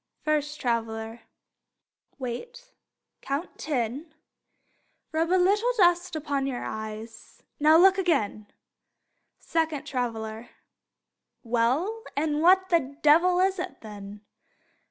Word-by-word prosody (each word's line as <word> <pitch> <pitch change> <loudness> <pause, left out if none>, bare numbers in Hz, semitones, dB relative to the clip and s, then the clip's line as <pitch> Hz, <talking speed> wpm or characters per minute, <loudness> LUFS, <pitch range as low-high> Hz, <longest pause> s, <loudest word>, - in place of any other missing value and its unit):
First 300 -1 -1
Traveler: 225 -1 -2 1.0
Wait; 475 - -7 0.5
count 280 +6 -4
ten; 285 +3 -3 1.0
Rub 325 +1 0
a 370 - +4
little 410 +6 +3
dust 350 -2 +3
upon 280 -3 -2
your 250 -3 -4
eyes; 220 +1 -8 0.2
Now, 310 +2 +6
look 380 +2 +6
again. 215 - 0 0.9
Second 320 -3 -2
Traveler: 225 -3 -4 0.9
Well, 260 - 0
and 300 0 0
what 375 +2 +5
the 280 -6 0
devil 340 +4 +5
is 380 0 +1
it, 360 - -6
then? 205 -1 -10
295 Hz, 100 wpm, -26 LUFS, 230-350 Hz, 1.0 s, Now